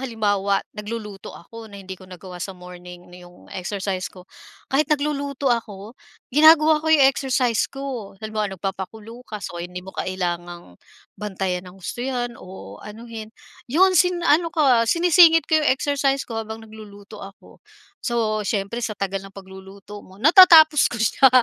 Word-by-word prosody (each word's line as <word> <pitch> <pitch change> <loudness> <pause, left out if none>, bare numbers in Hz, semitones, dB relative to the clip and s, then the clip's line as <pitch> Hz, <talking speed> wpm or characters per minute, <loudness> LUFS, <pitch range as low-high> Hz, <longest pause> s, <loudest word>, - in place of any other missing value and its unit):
halimbawa 205 -5 0
nagluluto 210 -2 -8
ako 225 +5 -12
na 200 - -12
hindi 190 0 -9
ko 185 - -15
nagawa 180 0 -11
sa 190 +1 -6
morning 180 0 -12
na 180 - -13
'yong 175 0 -17
exercise 190 0 -4
ko. 180 -1 -15 0.5
Kahit 275 +2 +2
nagluluto 285 -3 -1
ako, 215 -2 -5 0.4
ginagawa 310 +1 +6
ko 315 - -4
'yong 280 -4 +6
exercise 250 -3 0
ko, 265 -8 -7
halimbawa 215 -3 -3
nagpapakulo 205 +5 -7
ka, 215 - -5
so 175 - -6
hindi 180 +1 -7
mo 190 - -11
kailangang 175 - -5 0.4
bantayan 190 -3 -4
ng 180 - -15
husto 195 +6 -7
iyan 245 -2 -3
o 100 - -11
anuhin. 220 0 -9 0.4
Iyon 370 +8 +4
si 360 +1 +5
ano 335 -1 +2
ka, 250 -7 +3
sinisingit 335 0 +5
ko 315 0 +2
'yong 300 - +2
exercise 275 0 -1
ko 225 -2 -5
habang 220 0 -8
nagluluto 210 -1 -13
ako. 195 0 -14 0.4
So 220 -3 -1
syempre 205 +3 -2
sa 215 -3 -4
tagal 195 -1 -3
ng 195 - -16
pagluluto 195 +1 -12
mo 190 - -17
natatapos 315 -1 +7
ko - - -4
siya, 265 +4 +4
215 Hz, 155 wpm, -22 LUFS, 190-270 Hz, 0.5 s, natatapos